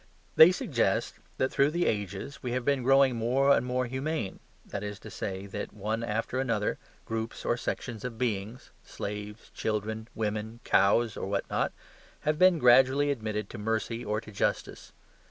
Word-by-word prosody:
They 160 +3 +9
suggest 140 -9 0 0.2
that 130 - +1
through 140 +1 +3
the 175 +3 0
ages 100 +6 -3
we 125 -1 -3
have 125 -1 -2
been 140 -2 +2
growing 135 0 +4
more 130 +5 +3
and - - +1
more 125 0 -1
humane, 130 -4 -3 0.3
that 100 - -5
is 105 -1 -5
to 110 - -10
say, 95 0 -4
that 105 +2 -6
one 110 +3 -2
after 115 +3 -2
another, 115 -5 0 0.3
groups 115 0 -4
or - - +2
sections 120 -2 -4
of 125 -3 -5
beings, 110 0 -3
slaves, 105 +1 -7
children, 110 +1 -2
women, 110 +1 -3
cows, 110 +3 +3
or - - -4
what 100 0 -1
not, - - +1 0.5
have 155 +1 0
been 185 -2 +6
gradually 130 +2 +5
admitted 110 -5 -3
to 115 - -7
mercy 115 +2 -2
or 105 +1 -1
to 110 -1 -12
justice. 100 - -2
115 Hz, 170 wpm, -29 LUFS, 105-130 Hz, 0.5 s, They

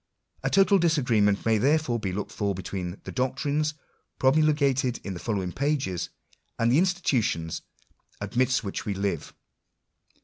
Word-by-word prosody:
A - - 0
total 195 0 +5
disagreement 120 - +2
may 110 -1 +3
therefore 140 -1 +2
be 100 -3 -2
looked 100 +3 -4
for 100 -2 -1
between 90 0 -5
the - - -7
doctrines 145 +4 0 0.4
promulgated 135 -3 +2
in 100 - -4
the 85 - -6
following 95 -5 -2
pages, 135 - -1 0.5
and 115 +1 +2
the 135 - +5
institutions 125 - 0 0.6
amidst 125 +5 +1
whioh 100 - -4
we 100 - -2
live. 95 -5 -3
120 Hz, 135 wpm, -27 LUFS, 100-145 Hz, 0.6 s, total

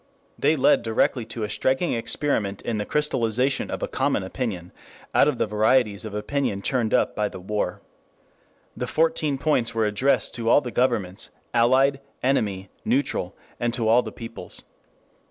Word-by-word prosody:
They 160 - +3
led 135 - +4
directly 115 +1 +1
to 115 0 -5
a 105 - -2
striking 130 +10 +1
experiment 115 -4 -1
in 115 -2 -2
the 105 - -3
crystallization 130 -3 0
of - - -4
a - - 0
common - - 0
opinion 95 -4 -4 0.4
out - - +5
of 145 -4 0
the - - +1
varieties 110 0 +2
of 105 -1 -6
opinion 105 -2 -2
churned 120 -4 0
up - - +2
by 105 -1 0
the - - -9
war. 95 -1 -3 0.9
The 125 - -3
Fourteen 155 -1 +1
Points 130 -6 +1
were 110 -1 +2
addressed 105 +7 +1
to 115 -2 -2
all 145 - +6
the 125 - -6
governments, 115 -7 0 0.2
allied, 130 +4 +3 0.2
enemy, 100 -8 0
neutral, 125 -8 -1 0.2
and 120 -1 0
to 115 -3 -1
all 115 +3 +5
the - - -7
peoples. 115 0 -9
115 Hz, 165 wpm, -24 LUFS, 105-130 Hz, 0.9 s, all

